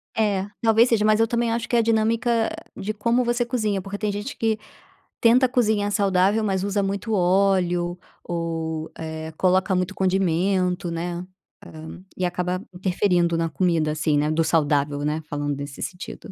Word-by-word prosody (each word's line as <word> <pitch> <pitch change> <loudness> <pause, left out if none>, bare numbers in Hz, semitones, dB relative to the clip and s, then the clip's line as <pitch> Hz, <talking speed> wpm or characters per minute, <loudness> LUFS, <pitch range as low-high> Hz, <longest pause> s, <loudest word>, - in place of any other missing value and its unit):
É, 200 -3 +1
talvez 225 +1 +4
seja. 220 -3 +2
Mas 215 0 +4
eu 225 - +4
também 235 0 0
acho 230 0 -2
que - - 0
é 235 - +5
a - - +5
dinâmica 225 +1 +1 0.3
de 210 +1 -3
como 235 +4 +1
você 240 0 0
cozinha. 215 -5 -1
Porque 200 +1 -6
tem 210 0 -1
gente 205 +7 -5
que 220 -1 0 0.6
tenta 245 +2 +5
cozinhar 215 -5 +1
saudável, 200 +1 +2
mas 190 -2 0
usa 200 0 0
muito 200 +3 -2
óleo 180 -2 +2 0.2
ou, 165 -2 -3
eh, 160 0 -6
coloca 185 +1 +2
muito 185 +1 -1
condimento, 185 -1 +1
né, 175 +1 -4 0.4
hã, 160 +3 -10
e 185 - -2
acaba 180 +1 -1
interferindo 180 -2 +1
na 165 0 0
comida, 160 -2 +1
assim, 155 -1 +1
né, 150 +1 +1
do 160 +1 +1
saudável, 145 -3 +1
né. 155 +2 -1
Falando 145 -1 -2
nesse 140 0 -7
sentido. 180 0 -6
190 Hz, 170 wpm, -23 LUFS, 165-215 Hz, 0.6 s, é